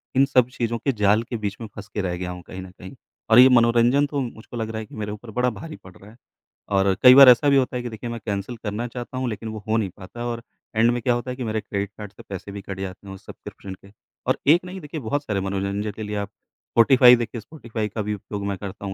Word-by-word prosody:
इन 135 +1 +5
सब 125 -2 +3
चीज़ों 120 -2 -2
के 135 - 0
जाल 105 +3 +4
के 120 - -3
बीच 105 -2 -4
में 110 - -5
फँस 105 - -9
के 105 - -1
रह 90 -2 -2
गया 90 0 -4
हूँ 90 0 -8
कहीं 95 0 -7
न 95 - -10
कहीं, 95 +7 -10 0.4
और 110 +2 +7
ये 130 +1 +9
मनोरंजन 120 +3 +4
तो, 140 -1 -2
मुझको 120 -1 -7
लग 110 -1 -3
रहा 110 0 -4
है 110 - -6
कि - - -14
मेरे 105 -1 -4
ऊपर 110 +2 -9
बड़ा 125 0 +3
भारी 160 -1 -8
पड़ 95 -1 -14
रहा 105 +2 -15
है। 115 - -19 0.5
और 95 -1 +3
कई 125 0 +10
बार 135 -2 +10
ऐसा 135 +4 +6
भी 140 - +5
होता 130 -1 +1
है 125 - -4
कि 120 - -4
देखिए, 115 +2 -7
मैं 115 0 -5
कैंसल 100 +3 -3
करना 110 +3 -3
चाहता 125 +1 -7
हूँ, 130 -1 -1
लेकिन 110 +1 -5
वो 110 -2 -7
हो 110 +1 +2
नहीं 100 -4 0
पाता 100 +5 -11
है 120 - -3
और 115 -1 -3 0.3
एंड 115 +2 +4
में 120 0 -2
क्या 120 +1 +2
होता 120 +1 -3
है - - -5
कि 125 - -4
मेरे 110 -1 -2
क्रेडिट 100 0 -3
कार्ड 105 -2 -8
से - - -14
पैसे 100 +1 -7
भी 100 0 -7
कट 95 0 -7
जाते 95 +1 -7
हैं 95 - -7
उस - - -16
सब्सक्रिप्शन 95 -1 -10
के, 100 +1 -19 0.4
और - - +2
1 170 +4 +6
नहीं, 185 0 -8
देखिए, 150 +1 -6
बहुत 145 +6 -2
सारे 100 -7 -2
मनोरंजन 100 +2 -2
के 110 - -5
लिए 105 0 -4
आप 100 0 -3
स्पॉटिफ़ाई, 125 +1 +4
देखिए, 115 -1 -4
स्पॉटिफ़ाई 115 -5 -5
का 110 +2 -4
भी 105 +1 -2
उपयोग 100 0 -6
मैं 100 -1 -2
करता 100 0 -8
हूँ, 95 - -4
110 Hz, 285 wpm, -23 LUFS, 100-125 Hz, 0.5 s, कई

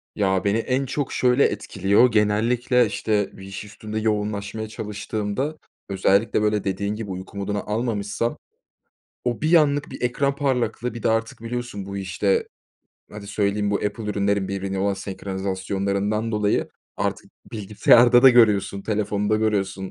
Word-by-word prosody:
Ya, 95 -2 +1
beni 100 +2 +2
en 130 +4 0
çok 140 +1 -3
şöyle 125 +2 +3
etkiliyor: 105 +3 +2
Genellikle, 115 +4 +2
işte, 105 -1 -1
bir 95 - -11
iş 95 +1 -7
üstünde 105 +1 -6
yoğunlaşmaya 105 0 -2
çalıştığımda, 105 +6 -4 0.3
özellikle, 100 +3 +2
böyle, 105 -1 +1
dediğin 100 +2 -2
gibi 105 -2 -6
uyku 95 +2 -8
moduna 100 +1 -2
almamışsam, 110 0 -2 0.9
o 120 -2 -2
bir 160 +3 +4
anlık 145 -2 +3
bir - - -8
ekran 140 +3 0
parlaklığı, 125 -4 -1
bir 115 - -8
de - - +3
artık 115 0 -1
biliyorsun 115 -4 -5
bu, 100 0 -6
işte 95 +1 0 0.6
hadi 105 -1 -9
söyleyeyim, 100 0 0
bu 100 - +2
Apple 105 +2 -3
ürünlerinin 100 -1 0
birbirine 95 0 -3
olan 100 +1 +1
senkronizasyonlarından 100 +2 -2
dolayı, 105 -1 +1 0.3
artık - - -3 0.2
bilgisayarda 115 +3 +5
da 135 - +10
görüyorsun, 105 -5 +3
telefonda 105 0 0
görüyorsun, 100 -3 -1
105 Hz, 140 wpm, -23 LUFS, 100-115 Hz, 0.9 s, da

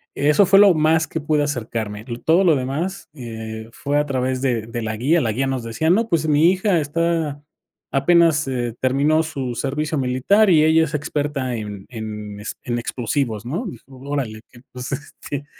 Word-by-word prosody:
eso 150 +7 +4
fue 195 +1 +6
lo 200 -2 +7
más 160 +1 +2
que 160 - -4
pude 150 0 +1
acercarme, 115 -6 -3
l 120 -2 -4
todo 170 +4 +4
lo 170 -5 +5
demás, 150 +9 -3
eh, 110 -4 -7
fue 145 +4 -1
a 150 - +1
través 130 -1 -1
de 125 -5 0
de 115 +1 -5
la 110 -1 -3
guía, 155 +9 +2
la 115 - 0
guía 130 +5 -1
nos 130 -2 -2
decía: 115 +8 0
"No, 220 +5 +2
pues 160 -3 +1
mi 155 +3 +5
hija 190 -1 +1
está 155 -1 -1 0.5
apenas, 160 +1 +3
eh, 120 -3 -2
terminó 145 +5 +2
su 135 -6 -4
servicio 150 +5 -2
militar 135 +12 +3
y 155 -3 +6
ella 160 +1 +5
es 150 - -8
experta 145 -3 -2
en 105 -3 -6
en 105 -3 -7
es 105 - -6
en 120 -1 -2
explosivos", 120 -2 -2
¿no? 175 - -3 0.2
Órale, 130 -4 -5
que 120 - -16
pues, 125 +2 -7
este, 145 0 -6
140 Hz, 185 wpm, -21 LUFS, 120-160 Hz, 0.5 s, lo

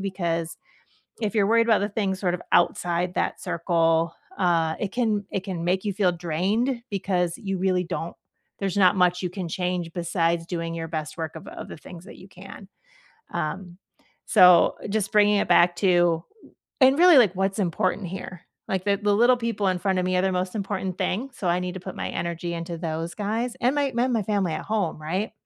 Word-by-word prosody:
because, 170 -4 -2 0.7
if 215 +1 -2
you're 200 -2 +3
worried 230 +1 +3
about 220 - +5
the 205 - -1
things 195 -2 -2
sort 180 -3 0
of 180 - -4
outside 175 +1 +1
that - - -1
circle, 165 -1 +1 0.2
uh, 165 -3 +2
it 205 - -3
can 220 -4 0
it 195 - -2
can 185 -4 -4
make 185 +3 0
you 205 - -1
feel 190 -2 +2
drained 190 - -1
because 180 -3 -1
you 195 -1 -3
really 185 -1 +1
don't 170 0 -5 0.4
there's 195 -2 -2
not 185 -1 +5
much 180 -1 +2
you 180 - -2
can 180 -1 -5
change 180 -1 -2
besides 170 -1 0
doing 165 -2 -3
your 165 -1 -4
best 155 -2 -5
work 160 -1 -5
of 160 - -10
of - - -8
the - - -9
things 175 +3 -12
that - - -12
you 185 - -14
can, 195 +1 -12 0.6
um, 175 +2 -4 0.5
so, 180 -2 +6
just 205 -1 -1
bringing 210 0 +4
it - - 0
back 175 0 +5
to 175 -3 +3 0.6
and 265 +3 +6
really, 355 -3 +8
like, 210 -8 +5
what's 195 +2 -1
important 185 +1 0
here, 185 -1 -7 0.3
like, 190 -1 -2
the 200 -1 +2
the 205 0 0
little 240 +4 +5
people 230 -4 -1
in 185 - -1
front 190 0 0
of 180 - -1
me 185 - 0
are - - +3
the 190 - +1
most 185 0 -2
important 195 -2 -3
thing, 235 +9 -1
so 185 - -4
I 175 +1 +2
need 180 0 -4
to - - -5
put 190 0 -8
my - - -4
energy 170 0 -4
into 170 0 -5
those 165 0 -4
guys 225 +4 -2
and 250 +2 +3
my 280 -2 +1
my 240 -2 +1
family 195 -4 0
at - - -5
home 200 -8 -2
right, 185 +8 -2
185 Hz, 205 wpm, -25 LUFS, 170-205 Hz, 0.7 s, really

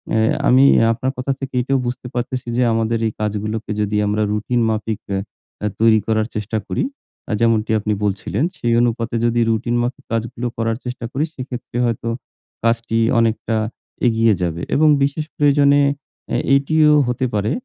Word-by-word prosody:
এ - - +3 0.3
আমি 130 +2 +6 0.3
আপনার 125 +3 -1
কথা 125 +2 -1
থেকে 135 -1 -6
এইটাও 135 +2 +1
বুঝতে 125 0 -5
পারতেছি 125 +1 -3
যে 125 - +3
আমাদের 115 0 0
এই - - -2
কাজগুলোকে 105 +1 -3
যদি 105 0 0
আমরা 105 +1 0
রুটিন 110 +3 0
মাফিক 110 0 -2 0.2
এহ - - -1 0.6
তৈরি 110 -1 +5
করার 110 -1 +1
চেষ্টা 105 +1 -2
করি - - -1 0.6
যেমনটি 115 -2 +2
আপনি 105 0 -1
বলছিলেন। 105 +4 -1
সেই 120 -1 0
অনুপাতে 115 0 -1
যদি 120 0 +1
রুটিন 115 +2 0
মাফিক 125 +3 -4
কাজগুলো 115 +2 -2
করার 115 0 -1
চেষ্টা 125 -1 -5
করি 140 - -1
সেক্ষেত্রে 125 -3 -6
হয়তো 115 0 -2 0.5
কাজটি 115 0 +1 0.2
অনেকটা 115 0 0 0.5
এগিয়ে 115 -1 +3
যাবে 85 -1 -2
এবং 155 +1 +4 0.2
বিশেষ 140 +2 -1
প্রয়োজনে 145 -1 +4 0.5
এ - - +3 0.2
এটিও 150 +2 +4
হতে 125 +1 -1
পারে 105 +2 0
115 Hz, 155 wpm, -19 LUFS, 110-125 Hz, 0.6 s, আমি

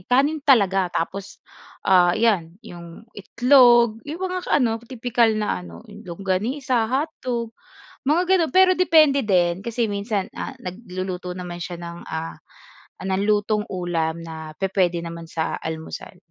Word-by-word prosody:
kanin 285 +5 +2
talaga 195 -9 +3
tapos 190 +3 -5 0.4
ah, 180 -2 +4
iyan 195 -7 +1
'yong 170 +4 -11
itlog, 240 0 +4
'yong 295 +6 -7
mga 365 -1 -4
ka - - -5
ano, 230 -4 +1
tipikal 240 -1 0
na 210 - -1
ano, 85 -1 -12
yung - - -13
longganisa, 220 - -1
hotdog, 255 -4 -2 0.6
mga 320 +4 +3
gano'n. 330 -3 +1
Pero 370 0 +6
depende 310 -6 +5
din 180 -3 +2
kasi 235 +1 -2
minsan 200 -1 -2
ah 270 - -6
nagluluto 185 -4 -6
naman 175 -1 -7
siya 175 +1 -5
ng, 170 0 -7
ah, 160 +1 -5 0.7
ng 190 0 0
lutong 210 0 +1
ulam 170 -3 -2
na 160 -1 -8
pupuwede 185 -3 0
naman 170 -1 -8
sa 160 -1 -2
almusal. 160 0 -7
200 Hz, 140 wpm, -22 LUFS, 175-245 Hz, 0.7 s, Pero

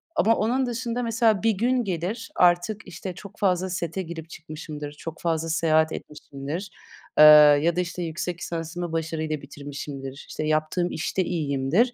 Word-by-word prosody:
ama 225 +1 +4
onun 250 +5 +1
dışında, 245 0 -3
mesela, 225 -3 +2
bir 225 - +4
gün 245 +5 +1
gelir, 195 +4 -3
artık, 180 +5 +2
işte, 185 +1 -7
çok 200 +1 -12
fazla 185 -1 +1
sete 175 0 -3
girip 165 -2 -7
çıkmışımdır, 155 -2 -8
çok 160 +2 -8
fazla 165 -1 -1
seyahat 160 -1 +3
etmişimdir, 150 +5 -7 0.5
eee, - - +10 0.4
ya 170 0 +2
da, - - 0
işte, 175 0 -4
yüksek 170 +1 -4
lisansımı 165 +1 -4
başarıyla 160 -2 -2
bitirmişimdir, 140 -1 -8
işte, - - -4
yaptığım 155 +3 0
işte 180 +3 -1
iyiyimdir. 160 - +1
170 Hz, 150 wpm, -25 LUFS, 155-195 Hz, 0.5 s, eee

